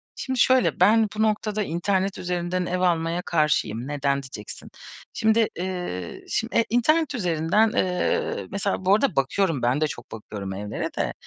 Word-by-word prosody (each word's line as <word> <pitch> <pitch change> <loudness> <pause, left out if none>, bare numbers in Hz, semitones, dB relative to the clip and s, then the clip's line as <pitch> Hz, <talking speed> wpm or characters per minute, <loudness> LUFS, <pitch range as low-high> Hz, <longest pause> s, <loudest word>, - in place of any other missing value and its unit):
Şimdi 260 -1 -3
şöyle, 255 +2 +3
ben 215 +4 +5
bu 215 - -1
noktada 215 -1 0
internet 190 +2 -1
üzerinden 180 0 -2
ev 180 +1 -2
almaya 170 -1 +1
karşıyım. 135 -8 0
Neden 140 -1 0
diyeceksin. 105 -5 -9 0.4
Şimdi, 220 0 +3
eee, 175 - -4
şimdi, 230 - -2
eee, 230 - +4
internet 300 +6 +2
üzerinden, 180 +2 +2
eee, 180 -1 0
mesela 200 -1 -2
Bu 195 - +5
arada 265 +4 +1
bakıyorum, 145 +2 +1
ben 125 +5 +1
de 155 - +3
çok 120 -4 -9
bakıyorum 105 -3 -6
evlere 105 +2 -4
de. - - -1
180 Hz, 155 wpm, -24 LUFS, 145-215 Hz, 0.4 s, ben